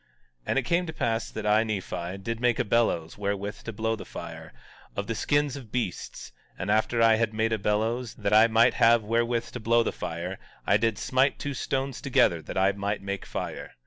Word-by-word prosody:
17:11 - - -37 0.4
And - - +1
it - - +4
came 170 +7 +1
to 160 - -5
pass 115 -1 -1
that 110 - -6
I, 105 +1 +4
Nephi, 95 -4 -4
did 115 +4 -4
make 120 -1 +2
a - - +1
bellows 100 -7 0
wherewith 100 0 -3
to 115 - -4
blow 110 +1 -1
the 110 - -8
fire, - - -8 0.4
of 100 - -2
the 115 - -2
skins 145 +4 +1
of 125 -7 -10
beasts; 115 -8 -4 0.3
and 90 +4 -2
after 110 +2 +2
I 115 -1 +6
had 110 -1 0
made 110 +1 +1
a 110 - 0
bellows, 110 +4 -1
that 100 -1 -1
I 110 +2 +7
might 115 +2 +4
have 115 -1 +5
wherewith 115 +2 0
to 125 - -6
blow 115 +1 +3
the - - -1
fire, 85 +3 -5 0.3
I 100 - +4
did 110 0 0
smite 130 +4 +2
two 145 - -4
stones 135 0 -2
together 90 - +3
that - - -7
I 95 +1 +4
might 100 +1 -3
make 100 0 -4
fire. - - -5
110 Hz, 215 wpm, -27 LUFS, 100-120 Hz, 0.4 s, I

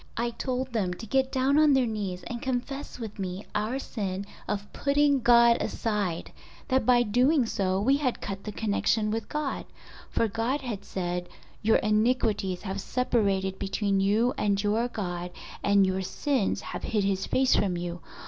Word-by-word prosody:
I 235 +1 0
told 255 +1 -3
them 190 -6 0
to 225 - -8
get 265 +4 +1
down 270 +3 +3
on 305 -2 +6
their 265 -2 +4
knees 200 -5 -3
and 235 +3 -5
confess 265 +2 -3
with 220 -4 -7
me 185 +1 -4
our 215 +5 -1
sin 200 -7 -4 0.2
of 205 0 -4
putting 285 0 +3
God 235 -1 +6
aside, 205 -7 -2 0.4
that 260 -3 +2
by 245 -1 +6
doing 250 +5 +3
so 190 -3 0
we 265 +7 +3
had 265 -4 -1
cut 195 0 -5
the 210 - -5
connection 215 0 0
with 225 +1 -3
God, 300 -2 -2 0.5
for 230 - +1
God 230 +7 -1
had 225 -7 -5
said, 180 -2 -3 0.3
'Your 220 +1 +4
iniquities 215 -4 +1
have 195 -1 -3
separated 195 -7 0
between 195 0 0
you 215 +6 +2
and 200 -1 +1
your 220 +3 +1
God 180 -6 -4 0.3
and 200 -1 +5
your 190 0 0
sins 260 +4 -1
have - - -6
hid 210 -3 0
His 195 -1 0
face 260 0 +3
from 185 -3 +1
you. 175 0 -5
215 Hz, 170 wpm, -27 LUFS, 195-250 Hz, 0.5 s, on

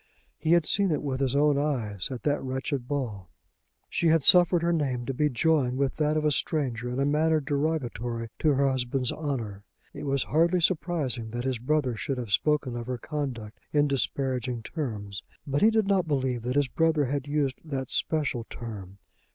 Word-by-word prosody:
He 160 - +2
had 170 -2 +4
seen 200 -1 +3
it 155 - -1
with 135 -2 -2
his 135 -1 0
own 145 0 +3
eyes 115 -10 -2
at 130 -3 -6
that 145 -1 +1
wretched 130 0 -3
ball. 115 - -3 0.6
She 170 - 0
had 160 -2 +4
suffered 175 0 +6
her 170 0 +2
name 130 -6 -1
to 135 - -2
be 150 +3 +1
joined 135 -2 +1
with 135 -1 0
that 150 0 +1
of 155 - 0
a 150 - +3
stranger 130 -6 -1
in 125 +2 -3
a 140 - +2
manner 155 +2 +2
derogatory 135 -6 -2
to 155 -2 +3
her 140 0 +2
husband's 130 -1 0
honour. 115 -10 -4 0.3
It - - -7
was 140 -2 +1
hardly 170 +4 +2
surprising 155 -9 0
that 120 +2 -4
his 130 -3 -1
brother 130 -1 0
should 135 +5 -3
have 120 -5 -5
spoken 145 +2 +1
of 120 0 -5
her 125 -1 -2
conduct 125 -7 -5
in 145 0 +4
disparaging 125 0 -1
terms; 105 - -5 0.2
but 140 -1 -1
he 215 - +7
did 220 -2 +2
not 195 -3 +2
believe 130 -4 0
that 125 +3 -3
his 145 -1 +3
brother 160 +1 +2
had 140 +1 -2
used 145 -3 -1
that 135 -5 -4
special 145 -7 0
term. 100 -5 -8
140 Hz, 190 wpm, -27 LUFS, 125-150 Hz, 0.6 s, he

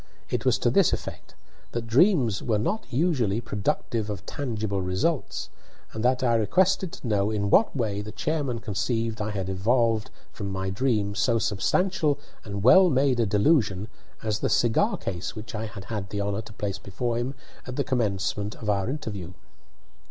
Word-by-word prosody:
It - - -1
was - - +4
to - - +1
this - - +4
effect: - - -6 0.4
that 120 -1 -2
dreams 125 - +3
were 110 -3 +1
not 200 - -2
usually 125 - +1
productive 110 0 -2
of 100 -4 -5
tangible 110 -7 -2
results, 95 - -1 0.4
and 110 - -4
that 125 +1 +2
I 120 -2 +3
requested 180 - +2
to - - -7
know 105 -2 +2
in 100 -2 -1
what 220 - +4
way 105 -6 -1
the 105 +1 -7
chairman 145 -5 -1
conceived 115 +1 -2
I 105 - -1
had 100 -3 -3
evolved 110 +3 +1 0.2
from 100 -2 -5
my 95 0 -2
dream 105 -2 0
so 115 +3 +2
substantial 150 - +1 0.3
and 100 -2 -5
well 185 - +8
made 135 -3 +2
a 115 - +3
delusion 105 - +2 0.3
as 110 -1 0
the - - 0
cigar 120 -2 +2
case 90 -2 -4
which 110 +1 -8
I 110 +1 -3
had 105 -3 -9
had 105 -3 -4
the 100 - -3
honour 100 +1 -1
to 110 -1 -12
place 100 -1 -3
before 115 +4 -2
him 130 +3 -3 0.3
at 125 - -5
the 140 - +1
commencement 105 -5 -1
of 105 -2 -1
our 100 +2 0
interview. 105 - -5
110 Hz, 175 wpm, -26 LUFS, 100-125 Hz, 0.4 s, well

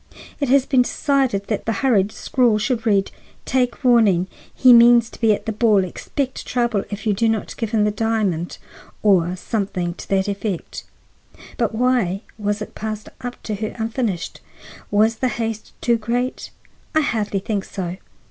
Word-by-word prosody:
It 280 -4 -1
has 270 0 +4
been 260 -3 +3
decided 260 -6 0
that 210 -1 -3
the - - +2
hurried 210 -6 +3
scrawl 240 -3 +1
should 230 +1 -1
read, 200 -2 +2 0.3
'Take 250 0 0
warning. 220 -8 +4 0.3
He 255 -1 +6
means 235 0 +6
to - - -14
be 225 -2 +4
at 205 - -1
the 225 - -1
ball. 215 -3 +3
Expect 260 - -4
trouble 235 -5 0
if 210 +2 -6
you 215 - +2
do 225 +3 +1
not 220 -2 -2
give 225 - -3
him 215 -1 +2
the 210 - +2
diamond,' 205 -6 -1 0.5
or 180 -4 +3
something 185 -3 -2
to - - -11
that 190 0 +1
effect. 200 -3 -4 0.7
But 230 -2 -1
why 230 -6 +1 0.2
was 205 0 -1
it - - -11
passed 215 -1 -5
up 245 0 -7
to 215 - -3
her 210 +1 -4
unfinished? 225 -5 -3 0.5
Was 220 +2 +3
the 255 - 0
haste 225 -3 -4
too 235 -1 +2
great? 240 +3 -2 0.5
I 315 - +5
hardly 215 -7 -1
think 200 0 -2
so. 180 -2 -5
220 Hz, 170 wpm, -21 LUFS, 200-240 Hz, 0.7 s, He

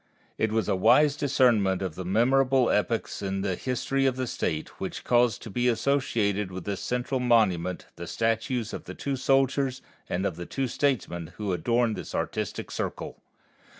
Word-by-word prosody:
It 110 - +1
was 110 -3 0
a - - +2
wise 145 +10 +5
discernment 120 -10 +2
of 95 -4 -3
the 95 - -6
memorable 130 +6 +3
epochs 110 +1 -1
in 95 -1 -2
the 95 -1 0
history 135 +4 0
of 130 - +1
the 130 0 -2
State 80 -9 -2
which - - -4
cause 120 -1 +3
to 110 - -10
be 120 +4 +1
associated 115 -6 +1
with 95 -1 -6
this 100 0 -4
central 125 +2 -1
monument 95 -8 +2
the 85 - -7
statues 115 +2 -1
of - - -6
the - - -8
two 140 -1 -2
soldiers 135 0 +1 0.3
and 90 +3 -1
the 85 -2 -3
two 135 -1 -2
statesmen 100 - -1
who 105 -3 -2
adorn 115 +6 +1
this - - -6
artistic - - -3
Circle. - - -5
115 Hz, 170 wpm, -27 LUFS, 95-130 Hz, 0.3 s, wise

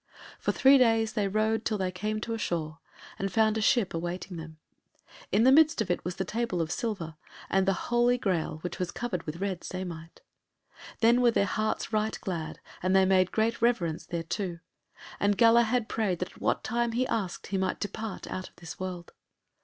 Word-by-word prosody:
For - - 0
three 270 0 +6
days 225 -2 +3
they 210 -3 0
rode 215 +2 +1
till 215 -2 0
they 185 -2 -1
came 210 +4 -2
to 230 - -3
a - - -2
shore, 160 -5 -3 0.4
and 195 0 -2
found 220 +2 +3
a 220 - 0
ship 215 -3 +2
awaiting 175 +2 -4
them. 160 -1 -9 0.5
And - - -19
in 205 +4 +4
the 260 - +7
midst 310 +3 +5
of 205 -5 0
it 175 - -1
was 180 0 -4
the 190 - -2
table 225 -2 -2
of 165 0 -1
silver, 175 -10 -3 0.3
and 195 0 +2
the 195 - +4 0.2
Holy 240 +1 +4
Graal 180 -8 -1
which 180 - -5
was 180 -1 -1
covered 195 -4 -3
with 155 - -3
red 190 -1 -3
samite. 170 -3 -7 0.8
Then 235 +2 +5
were 245 - +6
their 210 -3 +2
hearts 215 +2 -2
right 215 0 0
glad, 165 -4 -4 0.2
and 185 +1 +2
they 190 0 +6
made 185 -1 +3
great 225 +1 0
reverence 185 -10 +1
thereto, 170 +2 -3 0.6
and 205 0 +2
Galahad 230 0 +4
prayed 205 -5 0
that 180 - -4
at - - -18
what - - +1
time 235 0 0
he 250 +2 +1
asked, 205 -8 -3
he 195 -1 0
might 185 -1 -1
depart 215 0 -5
out 185 - -5
of - - -33
this 175 0 -10
world. 180 -2 -6
200 Hz, 200 wpm, -28 LUFS, 180-225 Hz, 0.8 s, the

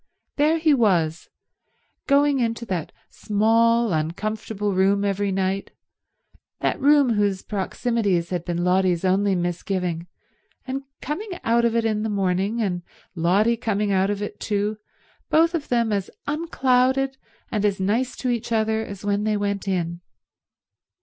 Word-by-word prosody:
There 305 +3 +3
he 315 -2 +3
was, 175 - +1 0.8
going 285 0 +4
into 230 -1 -1
that 185 -7 -3 0.2
small, 230 +1 +2
uncomfortable 205 +6 -2
room 195 +2 +2
every 200 0 0
night, 190 +1 -1 0.9
that - - -1
room 280 -3 +5
whose 205 -3 0
proximities 200 -3 -1
had 175 -2 -2
been 175 0 -2
Lotty's 180 -1 +2
only 195 +1 +2
misgiving, 175 -1 -2 0.6
and 270 +1 -3 0.2
coming 365 +10 -4
out 235 +1 +3
of 235 0 +1
it 230 -1 +1
in 215 -1 0
the 220 - -1
morning, 200 +3 0
and 180 -3 -2 0.3
Lotty 195 +7 +2
coming 210 -3 -1
out 190 0 +2
of 205 0 -2
it 205 - -6
too, 210 0 -1 0.5
both 330 +2 +4
of 315 -4 -2
them 235 -3 +1
as 200 -2 -2 0.2
unclouded 270 -3 +1 0.3
and 210 -3 -1
as 200 -2 +1
nice 220 +7 0
to 255 - -1
each 235 -1 -3
other 220 0 +1
as 200 -2 -8
when 205 0 0
they 215 -1 +1
went 200 -1 -2
in. 170 -2 -2
210 Hz, 145 wpm, -23 LUFS, 190-235 Hz, 0.9 s, room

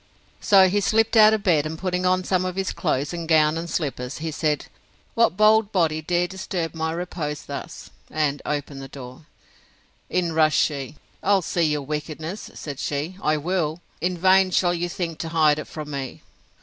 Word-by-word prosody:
So 195 -2 +6
he 200 +3 +1
slipt 225 +3 +2
out 215 -1 +8
of 215 -2 0
bed, 155 -5 +3
and 160 +1 -6
putting 180 0 -1
on 185 0 +2
some 185 0 +1
of 185 -1 -3
his 190 0 -2
clothes, 145 -2 -1
and 170 -1 -5
gown 155 -1 +4
and 170 +1 -4
slippers, 135 -6 -3
he 160 +1 -4
said, 150 -1 -1 0.5
What 230 -5 +2
bold 215 0 +4
body 160 -5 +1
dare 175 +2 +1
disturb 180 -2 -4
my 160 0 -2
repose 165 -3 -4
thus? 145 +4 -8 0.2
and 150 -2 -1
opened 145 -2 -4
the 135 - -7
door. 130 +2 -11 0.8
In 175 -2 0
rushed 155 -1 +3
she: 140 -2 -1 0.3
I'll 195 -1 +3
see 170 - -1
your 150 -1 -1
wickedness, 155 +6 -5
said 145 -2 -7
she, 150 +6 -3
I 155 0 +2
will! 160 0 -1 0.2
In 180 +1 -1
vain 190 +2 +5
shall 175 -1 +2
you 175 0 -2
think 170 -2 -4
to 165 - -4
hide 155 -2 +3
it - - -5
from 150 -2 -7
me. 135 -2 -6
165 Hz, 190 wpm, -23 LUFS, 150-185 Hz, 0.8 s, out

